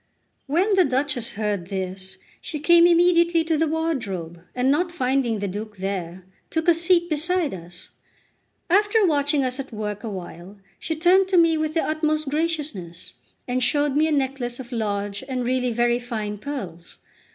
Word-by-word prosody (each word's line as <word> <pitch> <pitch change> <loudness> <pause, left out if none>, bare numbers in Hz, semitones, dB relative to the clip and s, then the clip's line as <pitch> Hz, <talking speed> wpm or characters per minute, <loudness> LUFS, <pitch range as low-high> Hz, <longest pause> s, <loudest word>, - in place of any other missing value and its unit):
When 360 +9 +2
the 380 -1 +5
Duchess 265 -4 0
heard 205 -4 -2
this, 190 0 -5 0.2
she 305 - -5
came 340 +3 +6
immediately 340 -1 +4
to 325 0 0
the 320 +1 +1
wardrobe, 225 - -3
and 255 +2 +2
not 345 +4 +1
finding 255 -7 0
the 200 0 -3
Duke 210 +2 -6
there, 185 -2 -4 0.3
took 320 0 -2
a 345 - +7
seat 345 +1 +3
beside 335 0 0
us. 175 0 -9 0.8
After 415 +3 +3
watching 290 -3 +2
us 255 +1 -2
at 275 -1 -6
work 210 -1 -5
a 225 - -4
while, 185 0 -8 0.2
she 320 - -2
turned 365 +4 +4
to 380 -1 +2
me 330 -1 +5
with 310 0 -2
the 325 - +2
utmost 310 -1 -1
graciousness, 295 - -3 0.3
and 250 0 -1
showed 290 +3 +2
me 310 +2 +3
a - - -1
necklace 265 -4 -1
of 250 -1 -9
large 205 -2 -2
and 255 -2 -2
really 250 0 0
very 240 +1 +1
fine 215 -4 -5
pearls. 190 - -7
265 Hz, 170 wpm, -23 LUFS, 210-320 Hz, 0.8 s, a